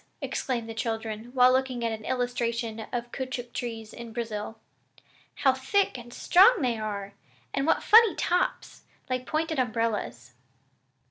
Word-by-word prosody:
exclaimed 240 -4 -3
the 225 - -6
children 225 -1 -3
while 250 0 +6
looking 255 -2 0
at 230 - 0
an 220 -1 -5
illustration 235 -3 -2
of 240 -1 -4
caoutchouc 255 -2 -5
trees 225 -3 -5
in 235 -1 -9
Brazil. 220 -2 -4 0.8
"How 265 -2 +3
thick 265 +10 +1
and 240 -1 -9
strong 385 - +5
they 240 -3 0
are! 200 -2 -4 0.4
And 275 +2 0
what - - +2
funny 445 -5 +7
tops! 360 +1 -1 0.3
like 255 0 -2
pointed 315 -1 -1
umbrellas." 220 - -2
240 Hz, 140 wpm, -27 LUFS, 225-260 Hz, 0.8 s, funny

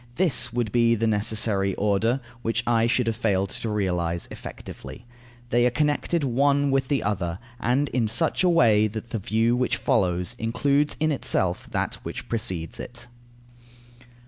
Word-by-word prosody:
This 140 -9 +2
would 120 -2 -1
be 115 -1 +3
the 115 +1 -1
necessary 105 -2 +1
order, 110 +5 +1 0.2
which 115 0 -1
I 115 -1 +3
should 125 +1 +1
have 115 -1 -1
failed 100 -4 0
to 115 - -4
realize 90 -5 -1
effectively. 120 - -9 0.5
They 120 +1 +3
are - - +3
connected 150 +4 0
one 140 +2 +2
with 135 -1 +1
the 140 0 0
other, 90 -5 -2 0.2
and 130 +5 +1
in 120 -3 0
such 130 - +1
a 180 - +4
way 110 -10 +4
that 110 +2 -7
the 115 - -2
view 110 +4 +1
which 125 0 0
follows 90 -1 0
includes 140 +6 +1
in 155 0 +2
itself 95 -10 -1
that - - -2
which - - -7
precedes 95 -8 -3
it. - - -7
115 Hz, 160 wpm, -25 LUFS, 105-130 Hz, 0.5 s, a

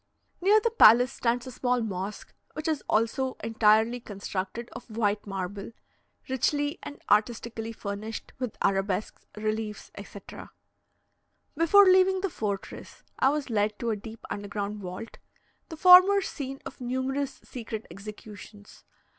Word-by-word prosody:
Near 410 +4 +5
the 465 +1 0
palace 245 - +7
stands 240 0 -1
a 255 - -7
small 250 0 0
mosque, 200 -2 -5 0.2
which 310 +2 -5
is 310 -3 -1
also 230 +4 0
entirely 225 +1 +3
constructed 200 +1 -5
of - - -10
white 210 -2 -1
marble, 195 +2 -5 0.5
richly 290 +4 0
and 290 - -9
artistically 225 +1 0
furnished 215 0 -6
with 250 -4 -4
arabesques, 195 +1 -1
reliefs, 215 0 -3
etc. - - -10 1.1
Before 335 +6 +6
leaving 375 0 +4
the 390 -2 -2
fortress, 205 -5 -5 0.2
I 265 - +5
was 285 -3 -2
led 210 -1 0
to 235 -1 -2
a - - 0
deep 220 +2 -10
underground 205 0 -4
vault 185 +4 -8 0.5
the 320 - -8
former 370 +3 +8
scene 275 -7 -6
of 260 - -9
numerous 260 +2 -2
secret 225 -3 -7
executions. 205 0 -11
230 Hz, 130 wpm, -27 LUFS, 210-270 Hz, 1.1 s, former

